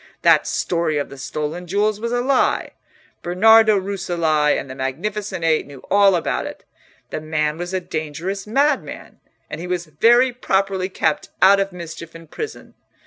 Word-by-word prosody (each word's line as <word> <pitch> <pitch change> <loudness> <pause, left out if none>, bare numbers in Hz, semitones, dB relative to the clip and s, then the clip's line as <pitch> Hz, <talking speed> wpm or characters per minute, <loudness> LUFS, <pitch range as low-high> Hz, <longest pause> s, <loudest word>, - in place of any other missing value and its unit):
That - - +5
story 165 -3 -1
of 145 - -2
the 140 - -11
stolen 155 +5 -4
jewels 205 +3 0
was 235 +1 -3
a 245 0 0
lie. 265 +1 +1 0.5
Bernardo 220 +4 +5
Rucellai 170 -6 0
and - - -7
the 130 - -7
Magnificent 185 +8 -4
Eight 160 -3 +1
knew 140 -2 -12
all 200 -2 +5
about 170 - -1
it. - - -10 0.5
The - - -4
man 155 0 -1
was 175 +1 -4
a 190 - 0
dangerous 175 +4 -5
madman, 280 +5 -1 0.3
and 155 +2 -7
he 180 - -6
was 180 -1 -2
very 240 - +3
properly 195 -5 -1
kept 160 -4 -1
out 195 +1 +6
of 195 0 -1
mischief 165 -2 -9
in 165 0 -11
prison. 430 - -8
180 Hz, 165 wpm, -20 LUFS, 155-205 Hz, 0.5 s, out